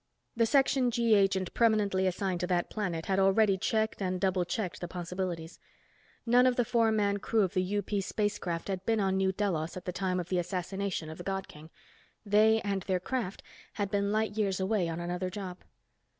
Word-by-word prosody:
The 230 -1 +3
Section 270 -1 +3
G 235 -1 +2
agent 195 -2 +2
permanently 210 -5 +2
assigned 185 0 -1
to 180 - -1
that 175 -1 0
planet 175 -6 -3
had 195 -1 +1
already 195 +1 +4
checked 220 +3 -1
and 185 -1 -1
double 185 -2 +1
checked 180 -4 -3
the 175 - -3
possibilities. 175 -1 -5 0.7
None 245 +2 +5
of 250 - +2
the 245 - +1
four 230 -1 +2
man 205 -2 +1
crew 215 +1 +1
of 185 - -1
the 185 +1 0
UP 205 - -4
spacecraft 195 -4 -2
had 190 -2 -3
been 225 +2 +1
on 190 -1 +1
New 190 0 +2
Delos 180 -5 -2
at 185 - -8
the 180 - -2
time 185 0 -1
of 175 0 -5
the 185 - +1
assassination 180 0 -3
of 160 - -10
the - - -6
God 195 +1 -3
King. 150 +1 -13 0.6
They, 215 +2 +4
and 200 -1 -1
their 185 -1 -1
craft, 210 0 -3 0.3
had 200 -2 -3
been 200 0 +1
light 215 0 0
years 200 -3 0
away 190 -2 0
on 165 +1 -4
another 175 +2 -3
job. 185 -2 -6
195 Hz, 200 wpm, -30 LUFS, 180-215 Hz, 0.7 s, None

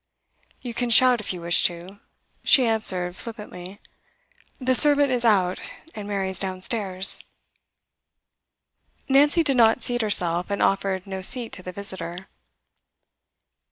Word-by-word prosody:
'You 245 -2 -7
can 245 +1 -3
shout 250 +1 +6
if 210 - -1
you 180 -2 -6
wish 170 0 +3
to,' 180 +3 -3 0.4
she 260 - +4
answered 185 -6 -2
flippantly. 205 -4 -10 0.8
'The 260 -1 0
servant 285 0 +5
is 245 -1 -2
Out, 190 -5 +1 0.3
and 205 -1 -9
Mary 195 -2 -3
is 190 - -3
downstairs.' 190 0 0 1.9
Nancy 290 +4 +2
did 275 -4 0
not 230 +1 +3
seat 240 -1 -2
herself, 180 -5 0
and 200 - -3
offered 195 -1 -1
no 190 -1 -7
seat 235 +4 +1
to - - -9
the 185 - -9
visitor. 185 -2 -4
200 Hz, 130 wpm, -22 LUFS, 185-240 Hz, 1.9 s, shout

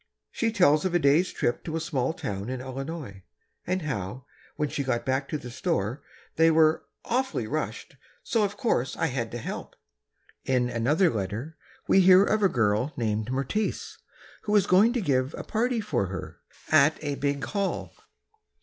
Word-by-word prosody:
She 230 -1 0
tells 155 -8 +4
of 185 -2 -1
a - - +7
day's 155 +5 +3
trip 120 - -1
to 160 - -4
a - - 0
small 140 -5 -1
town 100 -8 -5
in 130 0 -3
Illinois, 130 - -6 0.5
and 185 -1 -1
how, 125 -2 -4 0.3
when 150 - -1
she 140 - -3
got 120 -3 -1
back 135 +1 -1
to 155 - -1
the 125 -4 -9
store, 110 +2 -2 0.4
they 165 +1 +6
were 160 -1 +3 0.2
"awfully 260 +2 -1
rushed, - - -4 0.3
so 225 -2 +1
of 205 0 -2
course 215 - 0
I - - +1
had 125 -6 -2
to 120 - -5
help." 115 - -6 0.7
In 125 -2 +1
another 150 +11 +2
letter, 110 +8 -4 0.3
we - - +5
hear 185 +1 +7
of 215 +1 +1
a 195 - +4
girl 110 +2 +1
named 110 -1 -1
Mertice, 135 +11 -2 0.5
who 210 - +1
is 205 - +5
going 200 +6 +5
to 245 - 0
give 135 -5 0
a - - -6
party 235 +2 0
for 130 - -1
her, 95 +1 -7 0.3
"at 155 0 +5
a 145 -1 -1
big 140 0 -2
Hall." 200 -2 -2
145 Hz, 175 wpm, -27 LUFS, 125-185 Hz, 0.7 s, a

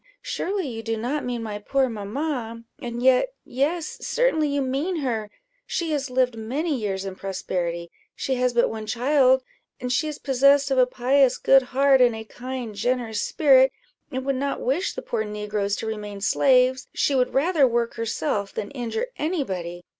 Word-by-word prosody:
surely 385 -3 -2
you 225 -3 -5
do 225 0 -2
not 255 +7 -2
mean 240 -2 -3
my 210 -2 -5
poor 270 +5 +1
mamma? 230 +1 -4 0.2
And 240 0 -4
yet 260 - +4
yes, 325 - -2
certainly 320 -12 +1
you 285 0 0
mean 275 +8 -1
her 225 -6 -2 0.4
she 335 -2 -2
has 280 -2 -1
lived 250 -1 +1
many 275 +9 -2
years 195 -5 -3
in 195 - -4
prosperity 175 -3 -3 0.2
she 270 - -2
has 250 0 +1
but 240 0 +3
one 220 -1 -6
child, 260 +2 +3 0.4
and 250 0 -3
she 280 +5 +1
is 300 -1 -4
possessed 275 +1 +3
of 265 - +3
a 250 - +5
pious, 260 +1 +3
good 270 0 +5
heart, 270 +1 +3
and 240 -2 +4
a 220 - -6
kind, 245 0 -6
generous 230 +1 -1
spirit, 265 -4 +5 0.4
and 260 0 -3
would 275 -1 0
not 280 +1 -2
wish 305 +10 -1
the - - -5
poor 225 -2 -2
negroes 210 -1 -2
to - - -5
remain 210 -2 -5
slaves 255 +4 +3
she 285 - +2
would 255 -2 +1
rather 295 0 +4
work 235 -1 0
herself 225 -2 -2
than 205 - -5
injure 255 - -3
any 315 0 0
body. 175 -4 -6
250 Hz, 180 wpm, -24 LUFS, 220-275 Hz, 0.4 s, a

